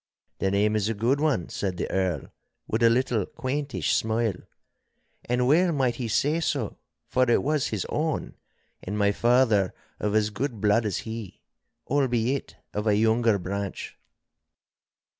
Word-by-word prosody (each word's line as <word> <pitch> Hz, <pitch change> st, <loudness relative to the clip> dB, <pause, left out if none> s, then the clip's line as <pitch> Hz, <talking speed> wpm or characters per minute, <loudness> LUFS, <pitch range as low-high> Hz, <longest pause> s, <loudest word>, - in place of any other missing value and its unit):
'The 95 Hz, -, +1 dB
name 105 Hz, +2 st, +2 dB
is 105 Hz, 0 st, +1 dB
a 115 Hz, -, -1 dB
good 120 Hz, +7 st, +1 dB
one,' 145 Hz, -, +1 dB
said 95 Hz, -3 st, -3 dB
the -, -, -2 dB
Earl, 95 Hz, -6 st, -1 dB, 0.4 s
with 110 Hz, -, -1 dB
a 115 Hz, -, +6 dB
little 120 Hz, -4 st, +1 dB
quaintish 140 Hz, +1 st, -2 dB
smile. 110 Hz, -1 st, +1 dB, 0.9 s
And 125 Hz, +1 st, +1 dB
well 170 Hz, +6 st, +4 dB
might 130 Hz, -6 st, 0 dB
he 125 Hz, -, -3 dB
say 145 Hz, +8 st, +1 dB
so, 140 Hz, -8 st, -2 dB, 0.3 s
for 130 Hz, -1 st, +2 dB
it 120 Hz, -, +3 dB
was 150 Hz, 0 st, +1 dB
his 110 Hz, -4 st, -2 dB
own, 155 Hz, 0 st, -2 dB, 0.5 s
and 105 Hz, +3 st, -4 dB
my 100 Hz, -1 st, +3 dB
father 115 Hz, -4 st, +3 dB, 0.2 s
of 105 Hz, 0 st, -1 dB
as 110 Hz, 0 st, +2 dB
good 120 Hz, +2 st, -3 dB
blood 105 Hz, +2 st, +3 dB
as 100 Hz, -, -1 dB
he, 110 Hz, -4 st, -7 dB, 0.4 s
albeit 130 Hz, -1 st, 0 dB, 0.2 s
of 105 Hz, +1 st, -2 dB
a 105 Hz, -, +4 dB
younger 110 Hz, 0 st, +3 dB
branch. 100 Hz, +1 st, -5 dB
115 Hz, 155 wpm, -26 LUFS, 105-130 Hz, 0.9 s, a